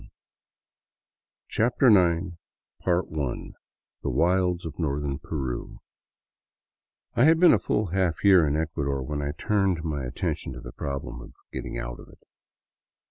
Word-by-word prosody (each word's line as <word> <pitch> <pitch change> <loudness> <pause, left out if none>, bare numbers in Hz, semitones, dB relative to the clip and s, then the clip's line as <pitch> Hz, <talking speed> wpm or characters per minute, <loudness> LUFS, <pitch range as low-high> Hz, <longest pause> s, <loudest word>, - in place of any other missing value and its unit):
2(^ - - -15 1.4
CHAPTER 120 +4 +2
IX 90 -3 +3 0.5
THE 80 -7 -1 0.6
WILDS 90 +1 +1
OF 80 -1 -7
NORTHERN 70 -2 -1
PERU 65 -5 -4 1.4
I 120 - +4
HAD 160 +1 +5
been 180 -1 +7
a 110 - +4
full 105 +4 0
half 95 -3 0
year 95 -6 +6
in 70 - 0
Ecuador 70 -4 -2
when 75 +2 -3
I 70 0 -2
turned 95 -3 0
my 75 -4 -2
attention 65 +1 -3
to 65 - -8
the - - -9
problem 70 -4 -5
of - - -12 0.2
getting - - -5
out - - -5
of - - -13
it. - - -19
80 Hz, 135 wpm, -26 LUFS, 70-95 Hz, 1.4 s, been